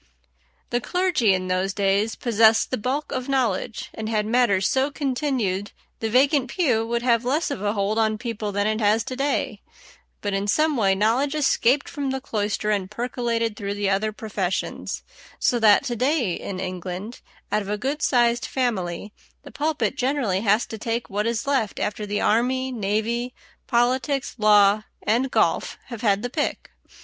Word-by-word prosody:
The 240 - +1
clergy 355 - +2
in 185 -1 0
those 185 +1 0
days 200 +2 +1
possessed 225 -1 +3
the 255 - 0
bulk 265 +7 -2
of 255 +1 -3
knowledge, 245 -4 -1
and 220 0 -5
had 215 -2 0
matters 215 -5 +2
so 265 +2 +1
continued 255 -9 -2 0.3
the 225 - -2
vacant 270 +2 +3
pew 240 -11 +1
would 235 0 -1
have 235 -2 +3
less 285 +6 0
of 245 - -4
a 205 0 0
hold 205 +1 0
on 220 -1 +2
people 215 -2 -4
than 205 0 0
it 215 +1 0
has 215 +1 +3
to 255 - -5
day; 280 +2 -1 0.6
but 205 -1 -3
in 195 +1 -1
some 305 +7 +2
way 195 -5 +3
knowledge 240 +9 +1
escaped 275 -2 +2
from 285 -4 -3
the 265 0 -2
cloister 210 -4 -2
and 195 -3 -1
percolated 230 -1 -2
through 200 0 -4
the 205 -1 0
other 210 +3 +1
professions, 200 -4 -3 0.3
so 240 - +1
that 215 -2 +6
to 240 - -2
day 255 - +1
in 185 +2 -5
England, 185 +4 -5 0.3
out 210 - +2
of 200 - -7
a 210 - -1
good 275 +7 -2
sized 240 -2 +2
family, 205 -6 -2 0.3
the - - -11
pulpit 295 -2 -1
generally 255 -8 0
has 210 +1 +3
to 220 - -8
take 230 +1 -3
what 210 +2 0
is 230 -1 -1
left 270 -7 0
after 210 0 -2
the 205 0 -1
army, 255 +4 +1
navy, 230 +3 -1 0.3
politics, 260 +3 +1
law, 210 -1 +5 0.2
and 240 +5 +1
golf - - +1
have 235 -3 -7
had 205 -1 +2
the 245 - -2
pick. 295 +1 -2
225 Hz, 175 wpm, -24 LUFS, 205-255 Hz, 0.6 s, that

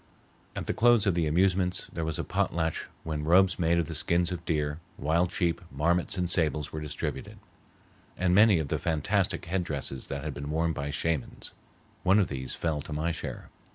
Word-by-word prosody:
At - - -4
the - - -1
close 120 -2 +4
of 100 - +3
the 85 -2 +1
amusements 90 +2 +1
there 80 - -3
was 80 -1 -1
a - - -2
potlatch 80 -1 -1 0.2
when 75 -2 -3
robes 90 +4 +4
made 85 0 +3
of 85 - +1
the 85 - -6
skins 85 +3 +1
of 90 - -4
deer, 75 -1 -1 0.2
wild 85 +4 +1
sheep, 85 -2 0
marmots, 85 +7 +1
and 90 -1 0
sables 75 -4 +1
were 80 - -5
distributed, 75 -1 -5 0.8
and 90 -1 +2
many 105 0 +6
of 80 -4 -2
the - - 0
fantastic 90 +5 0
head 90 +2 -1
dresses 70 -4 -4
that 70 +1 -4
had 75 -2 -3
been 70 +1 -6
worn 80 +2 +1
by 70 0 -4
Shamans. 75 -1 -2 0.5
One 95 +3 +4
of 100 -4 +3
these 65 -2 -4
fell 80 -3 -1
to 75 - -10
my 80 +3 0
share. 80 - -6
80 Hz, 195 wpm, -28 LUFS, 75-90 Hz, 0.8 s, many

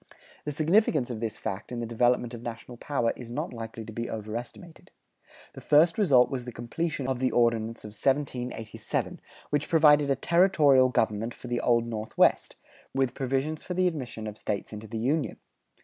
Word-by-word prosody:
The 150 - -2
significance 155 - +2
of 115 - -5
this 115 -1 -3
fact 95 +4 -5
in 120 - -4
the 120 - -2
development 120 +1 +1
of 115 - -7
national 120 +1 -7
power 120 -3 -1
is 120 -2 -10
not 120 - -4
likely 115 -1 -7
to 110 - -9
be 115 +2 -4
overestimated. 115 +10 -7 0.6
The - - -10
first 160 +3 +4
result 140 -12 +5
was 130 -2 -3
the 125 - -7
completion 135 +5 -3
of 130 -2 -1
the 130 0 +2
Ordinance 115 -1 +1
of 105 - -7
1787, 125 -2 -2 0.3
which 145 0 0
provided 150 -3 +5
a 135 - +3
territorial 150 -5 +4
government 110 -1 0
for - - -10
the 120 0 -1
Old 120 -1 +2
Northwest, 110 -2 +1 0.4
with 135 -2 +1
provisions 135 +4 -2
for 180 - -5
the 185 0 +2
admission 130 -10 -3
of 105 0 -6
States 105 +1 -3
into 105 +1 -8
the 115 - -5
Union. 140 +7 0
125 Hz, 180 wpm, -27 LUFS, 115-145 Hz, 0.6 s, result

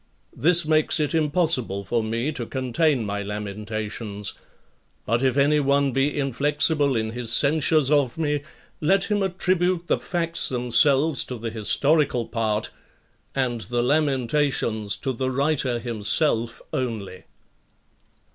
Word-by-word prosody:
This 170 +1 +4
makes 155 +1 +2
it 150 0 -1
impossible 150 - +1
for 115 +4 -1
me 115 +6 -2
to 120 -6 -5
contain 130 0 0
my 100 0 -3
lamentations. 105 0 -5 0.7
But 115 +2 0
if 130 0 +1
any 145 +2 +3
one 140 0 +2
be 135 +3 0
inflexible 145 +1 +1
in 110 -1 -1
his 120 -1 -4
censures 150 +2 +3
of 140 -4 +2
me, 150 -3 -1 0.4
let 195 +6 +2
him 205 -1 +1
attribute 180 -2 0
the - - 0
facts 170 -1 -1
themselves 135 +4 +2
to 125 - -6
the 115 0 -5
historical 125 +3 +1
part, 110 -2 -2 0.6
and 125 -4 -1
the 120 +1 -2
lamentations 130 -6 0
to 135 - -3
the 130 +2 -2
writer 135 -2 0
himself 115 +1 +1
only. 110 -7 -3
5. - - -22
135 Hz, 130 wpm, -23 LUFS, 115-150 Hz, 0.7 s, This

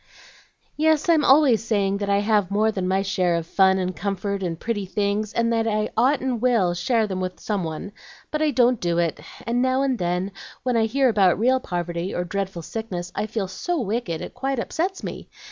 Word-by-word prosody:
"Yes, 310 0 +2
I'm 320 -3 +5
always 265 -6 +5
saying 200 -3 +1
that 200 -1 -2
I 200 0 +3
have 205 -3 +2
more 215 +2 +2
than 190 -3 -2
my 190 +1 +1
share 185 -3 +1
of 165 -1 -2
fun 190 +2 +3
and 185 -1 -2
comfort 200 0 -3
and 170 -3 -3
pretty 210 -4 -3
things, 205 +2 -1
and 230 0 +1
that 225 0 +1
I 215 -1 0
ought 260 +5 +3
and 250 -3 -2
will 230 -8 +3
share 225 +5 +1
them 190 -3 -3
with 185 0 -4
some 205 -4 -2
one. 160 +5 -5 0.4
But 305 - -1
I 310 - +3
don't 245 -3 +3
do 170 -1 0
it; 170 -2 0 0.3
and 235 +1 0
now 260 +1 +2
and 260 -4 0
then, 180 +2 -1 0.3
when 250 -1 0
I 225 -1 +3
hear 270 +4 +2
about 200 -6 +3
real 255 +5 +3
poverty, 175 -3 -3
or 175 - -1
dreadful 190 -1 -4
sickness, 180 -4 -5
I 215 - -2
feel 215 -3 -2
so 330 - -3
wicked 210 -7 -2
it - - -7
quite 270 0 -2
upsets 360 +10 -2
me. - - -7
210 Hz, 215 wpm, -23 LUFS, 185-245 Hz, 0.4 s, I'm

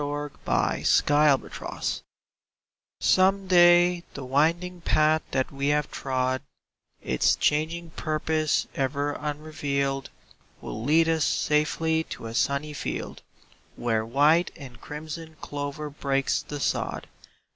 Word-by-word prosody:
^be 145 0 -3 0.2
Xast - - +2
Journeig 145 -2 +1 1.2
OME 195 +1 +3
day 175 -1 +5
the 135 - -6
winding 170 +7 +1
path 155 -1 +3
that 130 -1 -1
we 140 0 -2
have 150 0 +1
trod, 130 -1 -1 0.6
Its 65 - +2
changing 160 +3 0
puroose 155 -1 0
ever 140 +2 -1
unrevealed, 145 -2 -3 0.5
Will 110 - -6
lead 160 +5 +4
us 160 -2 +2
safely 160 +2 +1
to - - -8
a 115 - -6
sunny 140 +4 0
field - - -5 0.5
Where 115 -2 0
white 145 +9 +3
and 130 -5 -12
crimson 160 +2 -7
clover 145 +1 -5
breaks 135 -1 0
the 145 - -7
sod. - - -2
150 Hz, 115 wpm, -26 LUFS, 140-160 Hz, 1.2 s, day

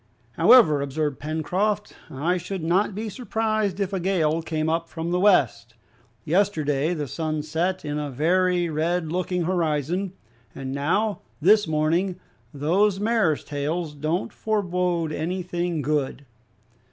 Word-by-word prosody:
"However," 170 - +6
observed 145 0 -2
Pencroft, 185 +7 -1 0.2
"I 165 +7 0
should 180 0 -5
not 185 +4 +1
be 220 +2 -3
surprised 215 -3 -1
if 200 -1 -1
a 190 - 0
gale 165 -4 +1
came 155 -1 -2
up 165 +1 -1
from 165 +1 -4
the 180 - +1
west. 120 - +2 0.5
Yesterday 160 -4 +1
the 150 -3 -3
sun 155 +2 -3
set 165 +4 -1
in 150 0 -2
a 145 -1 -3
very 175 +5 +2
red 160 +1 -1
looking 180 0 -1
horizon, 170 +1 -1 0.4
and 130 -1 -5
now, 185 +10 0 0.2
this 205 +5 +5
morning, 165 +4 0 0.3
those 185 +8 +1
mares 210 -8 +1
tails 150 +3 -3
don't 155 +5 -2
forbode 180 -6 -1
anything 175 -1 -2
good." 145 -1 -1
170 Hz, 130 wpm, -24 LUFS, 155-190 Hz, 0.5 s, However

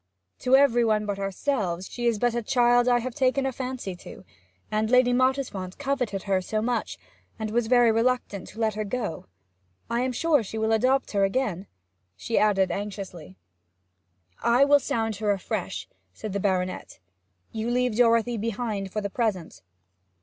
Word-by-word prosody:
To 255 +1 +4
every 260 -4 +4
one 215 -2 +1
but 200 -1 -3
ourselves 195 -3 -2
she 240 -1 -3
is 230 -2 +2
but 240 +2 +1
a 235 - -1
child 245 +1 +3
I 245 -1 +4
have 255 +1 -4
taken 265 +1 +1
a 265 - 0
fancy 255 -7 -5
to, 185 - -12 0.5
and 215 0 0
Lady 250 0 +4
Mottisfont 250 -8 0
coveted 260 -9 -2
her 190 -2 +1
so 215 +4 -2
much, 235 +1 -2 0.4
and 220 -1 -4
was 235 0 +1
very 245 -1 +5
reluctant 225 -4 0
to 220 - -12
let 220 -1 +1
her 215 +1 -3
go... 210 - -4 0.6
I 235 - +1
am 255 0 0
sure 300 +2 +2
she 220 +1 -6
will 220 0 0
adopt 255 +5 +2
her 200 -2 +1
again?' 195 -3 -1 0.5
she 225 - -1
added 195 -3 +2
anxiously. 195 - -6 1.0
'I 240 +4 +4
will 285 0 +5
sound 225 -5 -2
her 210 0 -1
afresh,' 195 -2 -2 0.3
said 215 -3 -6
the 200 - -1
baronet. 185 -2 -2 0.5
'You 220 +1 -3
leave 250 -2 +1
Dorothy 230 0 +3
behind 215 -3 -3
for 215 - -2
the 200 - -3
present?' 205 -8 -2
225 Hz, 170 wpm, -26 LUFS, 200-250 Hz, 1.0 s, very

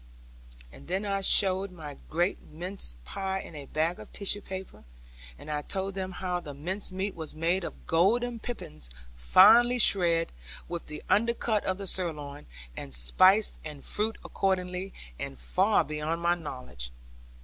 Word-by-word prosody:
And - - -14
then 190 +4 -1
I 195 -1 -1
showed 195 0 +5
my 150 -5 -9
great 175 +4 0
mince 175 - -3
pie 190 - -3
in 170 - -9
a 145 -3 -9
bag 160 +3 -1
of - - -11
tissue 205 0 +2
paper, 190 -1 -8 0.5
and 155 - -8
I 150 0 -1
told 195 +5 -3
them 190 0 -4
how 180 -1 -2
the 145 -5 -9
mince 185 +8 -3
meat 190 +1 -2
was 160 -2 -7
made 170 +4 +1
of - - -7
golden 230 +8 +2
pippins 75 - -6 0.2
finely 220 - +6
shred, 170 -7 +4 0.4
with 170 -1 -5
the 150 - -7
undercut 230 0 +2
of 185 - 0
the 200 - -6
sirloin, 150 -6 -3 0.3
and 70 -3 -3
spice 185 - +5
and 150 -3 -8
fruit 215 +1 -1
accordingly 185 0 -1 0.3
and - - -5
far - - +2
beyond 155 +2 -3
my 170 0 +2
knowledge. 125 - -7
180 Hz, 155 wpm, -29 LUFS, 150-195 Hz, 0.5 s, finely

